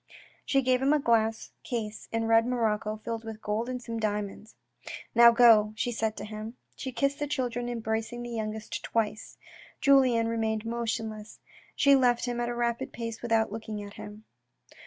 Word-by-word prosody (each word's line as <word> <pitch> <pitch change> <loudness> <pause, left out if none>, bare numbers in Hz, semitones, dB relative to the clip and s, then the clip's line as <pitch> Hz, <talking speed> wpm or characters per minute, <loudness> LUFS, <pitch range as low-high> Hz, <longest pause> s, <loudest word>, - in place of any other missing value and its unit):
She 275 -1 +1
gave 255 0 +2
him 275 +2 +3
a 300 - +3
glass 225 -3 +1
case 220 -3 -5
in 225 0 -1
red 225 +1 +4
morocco 215 -3 0
filled 230 -1 -4
with 220 -1 -7
gold 220 +3 -2
and 255 0 -3
some 230 -1 -5
diamonds. 210 0 -3 0.3
" - - -10
Now 235 0 +9
go," 230 -3 +6
she 240 +2 -1
said 220 -1 -2
to 205 - -5
him. 215 +2 -7 0.2
She 260 - -5
kissed 275 +3 0
the 295 - -1
children, 245 -3 -2
embracing 225 0 -3
the 240 - -6
youngest 215 -1 -4
twice. 220 -1 -2 0.4
Julien 255 -5 +4
remained 220 -1 -1
motionless. 225 -2 -4 0.4
She 280 0 +5
left 245 -3 +3
him 240 -1 -3
at 240 0 -1
a 240 - -3
rapid 235 0 -1
pace 230 -2 -6
without 225 -3 +1
looking 215 -1 -5
at 200 0 -10
him. 210 0 -10
230 Hz, 180 wpm, -28 LUFS, 220-240 Hz, 0.4 s, Now